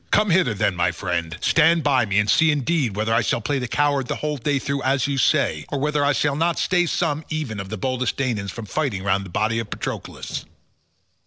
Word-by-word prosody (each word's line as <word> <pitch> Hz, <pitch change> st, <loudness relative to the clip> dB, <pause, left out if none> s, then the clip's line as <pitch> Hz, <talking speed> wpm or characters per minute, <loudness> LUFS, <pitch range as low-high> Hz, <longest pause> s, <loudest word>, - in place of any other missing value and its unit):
Come 210 Hz, -2 st, +3 dB
hither 165 Hz, -, +3 dB
then, 100 Hz, -2 st, 0 dB
my 90 Hz, 0 st, +1 dB
friend, 85 Hz, -2 st, -3 dB
stand 165 Hz, 0 st, +4 dB
by 135 Hz, -5 st, +2 dB
me 100 Hz, 0 st, 0 dB
and 105 Hz, 0 st, +3 dB
see 160 Hz, +10 st, +4 dB
indeed 145 Hz, -, 0 dB
whether 110 Hz, +2 st, 0 dB
I 115 Hz, -, +3 dB
shall 115 Hz, -, 0 dB
play 135 Hz, +5 st, -1 dB
the 125 Hz, -, -3 dB
coward 145 Hz, 0 st, +1 dB
the -, -, -2 dB
whole 150 Hz, -1 st, -3 dB
day 140 Hz, +3 st, 0 dB
through 140 Hz, +1 st, -2 dB
as 135 Hz, 0 st, +1 dB
you 140 Hz, -2 st, -1 dB
say, 75 Hz, -, +2 dB
or 145 Hz, -, -2 dB
whether 150 Hz, +1 st, 0 dB
I 145 Hz, -, +3 dB
shall 145 Hz, 0 st, +1 dB
not 165 Hz, +2 st, +1 dB
stay 175 Hz, -1 st, +2 dB
some 160 Hz, -2 st, -1 dB
even 150 Hz, -10 st, -3 dB
of 95 Hz, -1 st, -6 dB
the 110 Hz, -, -4 dB
boldest 130 Hz, +4 st, -1 dB
Danaans 115 Hz, -7 st, -1 dB
from 115 Hz, +4 st, -7 dB
fighting 110 Hz, -5 st, -2 dB
round 100 Hz, 0 st, 0 dB
the -, -, -9 dB
body 110 Hz, +5 st, 0 dB
of 115 Hz, -2 st, -5 dB
Patroclus." -, -, -5 dB
130 Hz, 230 wpm, -22 LUFS, 105-150 Hz, -, stand